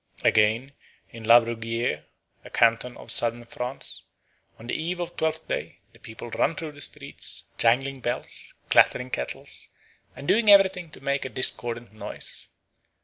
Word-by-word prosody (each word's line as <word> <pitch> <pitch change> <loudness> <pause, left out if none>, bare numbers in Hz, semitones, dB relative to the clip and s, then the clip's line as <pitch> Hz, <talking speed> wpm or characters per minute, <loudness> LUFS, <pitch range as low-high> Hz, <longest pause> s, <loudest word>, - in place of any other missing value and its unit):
Again, 110 +6 +3 0.4
in 115 -1 -9
Labruguière, 115 -7 +2 0.4
a - - -11
canton 115 +2 +2
of - - -5
Southern 120 0 +3
France, 125 +3 -5 0.5
on 115 - -12
the 120 - -4
eve 175 +3 -2
of 175 0 -4
Twelfth 160 0 -2
Day - - -4 0.2
the - - -20
people 115 +1 -9
run 120 +8 +1
through 160 -1 -5
the 145 -1 -14
streets, - - -2 0.2
jangling 135 +4 +3
bells, 120 0 -3 0.2
clattering 125 0 +4
kettles, 65 - -3 0.5
and 140 - -9
doing 220 0 +4
everything 190 -4 +5
to 150 - -13
make 140 0 -1
a 130 - -5
discordant 120 -2 0
noise. 105 -1 -7
125 Hz, 145 wpm, -25 LUFS, 115-150 Hz, 0.5 s, everything